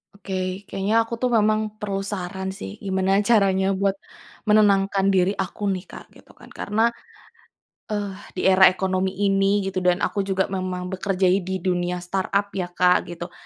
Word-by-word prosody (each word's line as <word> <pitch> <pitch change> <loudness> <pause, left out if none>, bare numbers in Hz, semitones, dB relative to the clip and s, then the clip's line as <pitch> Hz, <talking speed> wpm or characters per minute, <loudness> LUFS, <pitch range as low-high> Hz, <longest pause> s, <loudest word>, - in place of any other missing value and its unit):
Oke, 190 -1 -4
kayaknya 210 +4 +1
aku 225 - -9
tuh 255 - +1
memang 215 -1 +3 0.2
perlu 200 -3 -2
saran 190 -1 -4
sih, 95 - -8
gimana 190 0 +1
caranya 195 -3 +2
buat 195 0 +1 0.5
menenangkan 200 -2 +3
diri 190 +1 +2
aku 190 +2 -3
nih, 185 -2 -1
Kak, - - -11
gitu - - -18
kan. - - -17
Karena, 220 +3 0 1.0
eh, 205 -2 -3 0.2
di - - -3
era 190 0 +7
ekonomi 185 0 0
ini 195 0 +2
gitu 190 -1 -2
dan 180 +1 +1
aku 205 - -1
juga 190 -1 +1
memang 185 -1 -3
bekerja 190 0 -2
i 190 - +3
di 190 -1 -4
dunia 180 -1 -1
startup 195 +2 -1
ya, 185 -2 -2
Kak, 180 0 +3
gitu, 175 0 -7
195 Hz, 165 wpm, -23 LUFS, 185-200 Hz, 1.0 s, era